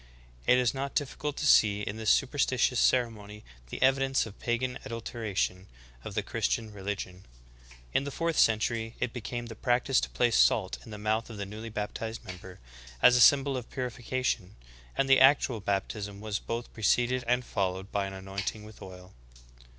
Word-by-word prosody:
"^ - - -24 0.4
It 125 - +6
is 125 -2 +2
not 135 +1 -4
difficult 145 0 -2
to 150 - -2
see 105 -7 +5
in 100 - -4
this 110 -1 -1
superstitious 130 -2 +2
ceremony 105 -4 0 0.3
the - - -6
evidence 135 0 +3
of 110 -2 -11
pagan 125 +1 -2
adulteration 110 -5 -3 0.4
of - - -7
the - - 0
Christian 110 -2 -2
religion. 95 -2 -5 0.7
In - - +2
the 140 - -4
fourth 165 +3 -1
century 115 +1 +2
it 125 -2 -2
became 120 0 -5
the 115 - -8
practice 125 +3 +1
to - - -3
place 120 -2 +1
salt 95 -4 +3
in - - -13
the 105 - -7
mouth 110 +2 -1
of 110 - -8
the 100 - -4
newly 110 +3 -8
baptized 110 +1 -5
member, 90 0 -10 0.4
as 125 - +8
a 125 - +4
symbol 140 +3 +6
of 125 -2 -5
puri 125 -2 -3
fication, 120 -5 -2 0.4
and 135 - +2
the 135 0 +6
actual 135 -3 +5
baptism 100 0 -3
was 105 -1 -3
both 115 +1 -5
preceded 120 +3 +1
and 125 +1 +1
fol 95 -3 -1
lowed 95 +2 -9
by 100 -1 -1
an 95 - -7
anointing 95 +2 -5
with 110 0 -13
oil. 90 0 -11
115 Hz, 180 wpm, -29 LUFS, 100-125 Hz, 0.7 s, as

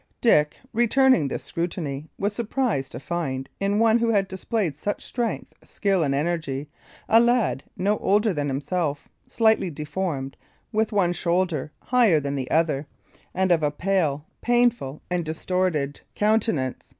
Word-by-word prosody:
Dick, 150 -11 +3 0.2
returning 240 - +4
this - - -4
scrutiny, 160 -4 -4
was 205 +1 -1
surprised 230 - -1
to - - -6
find 135 -4 -3
in 200 +1 +1
one 225 +1 +4
who 230 0 +1
had 200 -3 +2
displayed 190 - -2
such 205 +8 -4
strength, 235 -3 -3
skill 195 -3 0
and 140 -3 +1
energy, 150 -2 -2 0.4
a 225 - +6
lad 235 - +2
no 205 +3 +1
older 205 +1 +2
than 145 -2 -2
himself 145 +2 -2 0.2
slightly 220 -5 +2
deformed, 150 -2 -4 0.4
with 220 0 +1
one 185 -4 +2
shoulder 170 -4 0
higher 235 -11 +4
than 140 -1 -3
the 130 -2 -3
other, 155 -3 +1 0.5
and 190 0 +2
of 170 -2 +4
a 150 - +2
pale, 155 -3 0 0.2
painful, 240 - +1
and 180 -1 0
distorted 160 -3 -1
countenance. 210 - 0
175 Hz, 145 wpm, -24 LUFS, 150-215 Hz, 0.5 s, a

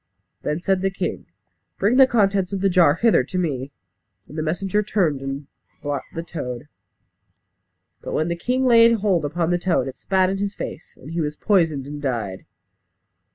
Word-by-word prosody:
Then 150 - -2
said 190 +1 0
the 195 - +1
king, 185 -2 -4 0.5
"Bring 210 +6 +2
the 265 -1 +8
contents 200 -5 +2
of 195 -2 -3
the 195 -1 +2
jar 170 -5 +5
hither 225 - +3
to 185 +8 -5
me." 140 -6 -2 0.6
And 150 - -12
the 155 - -2
messenger 190 +6 0
returned 180 -9 0
and 135 +1 -5 0.4
brought 145 -1 -2
the 165 - -3
toad. 145 -6 -6 1.3
But - - -6
when 155 - 0
the 170 - -1
king 250 +9 0
laid 230 -1 +6
hold 190 -6 +2
upon 165 +3 -1
the 175 - +1
toad, 170 -7 +1
it 135 - -6
spat 190 -1 +1
in 195 - -3
his 200 0 -2
face; - - -7
and 145 - -10
he 165 0 -1
was 150 -1 -2
poisoned 160 -10 +1
and 145 +1 -7
died. 115 -9 -3
175 Hz, 185 wpm, -22 LUFS, 145-195 Hz, 1.3 s, the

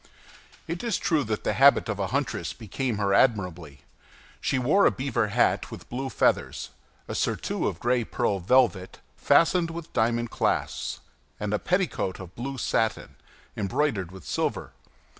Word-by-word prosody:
It 170 +5 -4
is 230 -5 0
true 155 -3 +1
that 110 -1 -3
the - - 0
habit 140 0 +5
of 105 -2 -3
a 100 - 0
huntress 140 +2 -2
became 115 +1 -3
her 100 -2 +1
admirably. 90 - +1 0.6
She 135 - 0
wore 145 +11 +4
a - - +6
beaver 130 -4 -1
hat 115 +4 +1
with - - -10
blue 130 +2 -3
feathers, - - 0 0.4
a - - -5
surtout - - -1
of 85 - -3
gray 120 0 +1
pearl 100 -2 -1
velvet, 100 -2 +2 0.2
fastened 170 0 +3
with 165 0 -8
diamond 120 0 +1
clasps, - - -1 0.4
and 105 0 -2
a 105 - +1
petticoat 180 - -1
of 90 -1 -10
blue 135 +5 -5
satin, 110 -2 -1 0.4
embroidered 100 - -1
with 95 -3 -12
silver. - - -2
120 Hz, 155 wpm, -26 LUFS, 100-140 Hz, 0.6 s, a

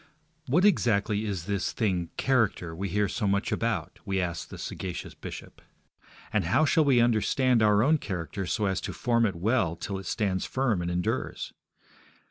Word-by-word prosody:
What 165 +10 +3
exactly 110 - +2
is 95 -6 -3
this 100 -1 -1
thing, 90 -6 0
character, 115 -10 +1
we 95 +3 -3
hear 105 +3 +1
so 105 +3 -2
much 100 +1 0
about? 115 -3 -2
we 95 -1 -1
ask 85 -2 -3
the - - -8
sagacious 90 -2 -5
bishop. - - -9 0.7
And 105 -5 +2
how 125 - +3
shall 160 +1 +4
we 135 -4 +4
understand 120 +1 +3
our 105 0 +4
own 155 +4 +3
character 95 - -4
so 105 - 0
as 95 -1 0
to - - -4
form 115 -2 +2
it 100 - -3
well 95 -2 +1
till 95 +3 -4
it 95 - -9
stands 95 -3 -1
firm 125 -8 0
and 85 - -2
endures? 90 0 -2
100 Hz, 175 wpm, -28 LUFS, 95-120 Hz, 0.7 s, shall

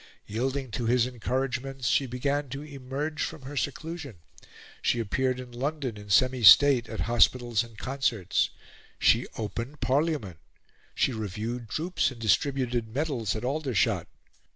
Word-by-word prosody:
Yielding 130 +4 -2
to 120 0 -2
his 120 0 +3
encouragements, 130 +1 -2
she 135 +2 +2
began 140 +3 -1
to 135 +3 -6
emerge 145 +2 -5
from 150 - -4
her 140 +3 -7
seclusion; 145 - -4 0.7
she 120 - +1
appeared 130 +4 0
in 125 -1 -9
London 135 0 -3
in 105 -1 -11
semi 130 +5 +3
state, 125 +4 +8
at 110 - -4
hospitals 120 0 +3
and 115 -2 -14
concerts; 125 -6 0 0.5
she - - +3
opened 115 +6 -5
Parliament; 135 - 0 0.6
she 130 - +2
reviewed 110 +2 -4
troops 170 - 0
and 130 -3 -11
distributed 120 +1 +1
medals 125 -3 -2
at 110 +3 -4
Aldershot. 135 -4 0
125 Hz, 135 wpm, -28 LUFS, 115-140 Hz, 0.7 s, state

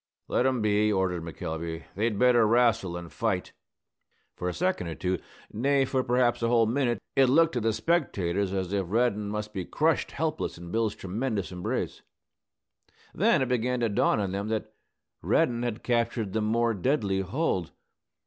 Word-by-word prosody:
"Let 125 - +2
'em 130 -4 0
be," 105 0 +3
ordered 95 -3 0
McElvey. 80 0 -5
"They'd 105 +1 0
better 120 -1 +5
wrastle 115 -5 +3
than 85 0 -6
fight." - - -2 0.8
For 90 - -3
a - - -1
second 180 - -1
or 80 - -5
two, 90 -1 -1 0.3
nay, 135 +4 +2
for 130 0 0
perhaps 120 -1 +2
a 115 - +2
whole 115 -1 +4
minute, 120 0 +1 0.2
it 135 -1 +5
looked 165 +4 +4
to 120 - -1
the 115 +1 +2
spectators 100 - 0
as 95 -1 -2
if 95 -3 0
Reddin 105 -2 +1
must 105 0 -4
be 95 - -3
crushed 155 - 0
helpless 155 - -2
in 85 0 -9
Bill's 110 -1 0
tremendous 105 +1 -3
embrace. 90 -1 -3 1.1
Then - - +3
it - - -2
began 125 0 0
to 115 - +2
dawn 100 - +2
on 100 -2 -1
them 100 +2 -3
that 110 0 -3 0.5
Reddin 120 -1 +2
had 120 -1 -3
captured 115 -4 0
the 110 - 0
more 115 +2 +1
deadly 100 -2 0
hold. 95 - -1
110 Hz, 170 wpm, -27 LUFS, 95-125 Hz, 1.1 s, better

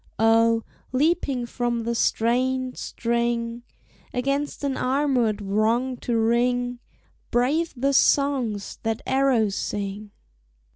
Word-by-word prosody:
Oh, 225 +1 +4 0.3
leaping 275 -2 +1
from 240 -1 -2
the 235 +1 -1
strained 255 +3 +1
string 235 0 -2 0.5
Against 275 +4 -2
an 275 -2 0
armored 255 -6 +1
Wrong 225 +6 +1
to 235 -1 -1
ring, 245 +2 +1 0.5
Brave 280 +8 +1
the 275 +3 +1
songs 260 -8 +1
that 225 0 -2
arrows 260 -6 +2
sing! 205 +1 -4
240 Hz, 100 wpm, -24 LUFS, 225-260 Hz, 0.5 s, Oh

